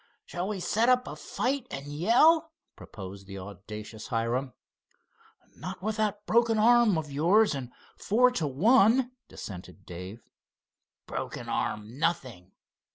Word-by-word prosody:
"Shall 175 Hz, +2 st, -4 dB
we 205 Hz, -2 st, -3 dB
set 225 Hz, +6 st, +1 dB
up 250 Hz, 0 st, +3 dB
a -, -, -6 dB
fight 260 Hz, 0 st, -2 dB
and 135 Hz, +1 st, -6 dB
yell?" 250 Hz, -, +3 dB, 0.2 s
proposed 95 Hz, -1 st, -10 dB
the 95 Hz, 0 st, -8 dB
audacious 105 Hz, +3 st, -9 dB
Hiram. 125 Hz, +2 st, -1 dB, 1.0 s
"Not -, -, -8 dB
with 215 Hz, 0 st, -2 dB
that 210 Hz, -1 st, -1 dB
broken 230 Hz, -1 st, +3 dB
arm 230 Hz, -3 st, +5 dB
of 150 Hz, -2 st, -4 dB
yours 175 Hz, +8 st, +3 dB
and 130 Hz, -3 st, -5 dB, 0.3 s
four 250 Hz, +5 st, +3 dB
to 165 Hz, -11 st, -1 dB
one," 230 Hz, -, +4 dB, 0.2 s
dissented 95 Hz, 0 st, -10 dB
Dave. 90 Hz, +6 st, -9 dB, 0.8 s
"Broken -, -, -5 dB
arm, 110 Hz, +5 st, -3 dB
nothing! 130 Hz, -, -2 dB
165 Hz, 130 wpm, -28 LUFS, -, 1.0 s, arm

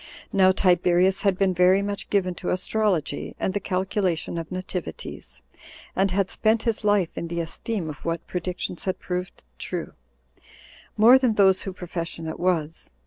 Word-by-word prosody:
Now 190 Hz, -1 st, +6 dB
Tiberius 180 Hz, 0 st, +3 dB
had 195 Hz, -3 st, +2 dB
been 190 Hz, -1 st, +2 dB
very 180 Hz, +2 st, +4 dB
much 200 Hz, 0 st, -4 dB
given 185 Hz, -3 st, +1 dB
to 180 Hz, -, -2 dB
astrology, 185 Hz, -3 st, 0 dB
25 -, -, -38 dB
and 190 Hz, -, -1 dB
the 205 Hz, -, 0 dB
calculation 185 Hz, -3 st, -1 dB
of 165 Hz, +1 st, -7 dB
nativities, 165 Hz, -, -6 dB, 0.5 s
and 195 Hz, +1 st, +2 dB
had 190 Hz, +1 st, 0 dB
spent 220 Hz, 0 st, +1 dB
his 230 Hz, -1 st, -1 dB
life 205 Hz, -5 st, +2 dB
in 170 Hz, -, -4 dB
the 170 Hz, 0 st, -3 dB
esteem 170 Hz, +3 st, -3 dB
of 150 Hz, -1 st, -8 dB
what 165 Hz, 0 st, -3 dB
predictions 180 Hz, 0 st, -4 dB
had 185 Hz, -, -1 dB
proved 180 Hz, +1 st, -5 dB, 0.2 s
true, -, -, -4 dB, 1.0 s
more 235 Hz, +5 st, +8 dB
than 250 Hz, -4 st, +2 dB
those 190 Hz, -2 st, +5 dB
whose 190 Hz, -2 st, -6 dB
profession 170 Hz, -2 st, -5 dB
it 160 Hz, -, -5 dB
was. 165 Hz, -3 st, -1 dB
185 Hz, 165 wpm, -25 LUFS, 170-200 Hz, 1.0 s, more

